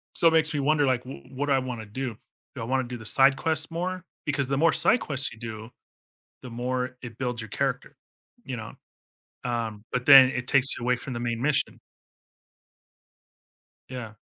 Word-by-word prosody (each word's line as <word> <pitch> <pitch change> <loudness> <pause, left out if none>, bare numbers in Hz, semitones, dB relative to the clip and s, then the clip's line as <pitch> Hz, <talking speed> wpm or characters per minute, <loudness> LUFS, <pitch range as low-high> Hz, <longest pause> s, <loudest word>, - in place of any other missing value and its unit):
So 165 - +5
it - - +6
makes 160 -1 +3
me 145 - -1
wonder, 145 +1 +2
like, 125 -2 +1
w 130 - -9
what 140 +3 -2
do 140 - +3
I - - +4
wanna 120 -4 -6
do? 120 0 -5 0.4
Do 125 - -6
I - - -3
wanna 130 +2 0
do 120 0 -6
the 110 - -12
side 135 +4 +5
quests 160 +2 0
more? 180 +2 -4 0.2
Because 140 -2 0
the 135 +1 -1
more 165 0 +5
side 245 - +3
quests 140 -1 -3
you 115 - -15
do, 110 0 -8 0.7
the 125 - -8
more 125 +2 -3
it 120 -2 -9
builds 125 -3 -3
your 110 - -9
character, - - -3 0.5
you - - -4
know? - - -8 0.7
Um, 115 -3 -3
but 125 0 -2
then 135 -2 +9
it 125 -1 -4
takes 135 -1 +3
you 120 - -5
away 125 0 +3
from 130 - -8
the 120 - -4
main 120 0 -2
mission. 145 0 0 2.1
Yeah. 120 -4 -7
130 Hz, 200 wpm, -26 LUFS, 120-140 Hz, 2.1 s, then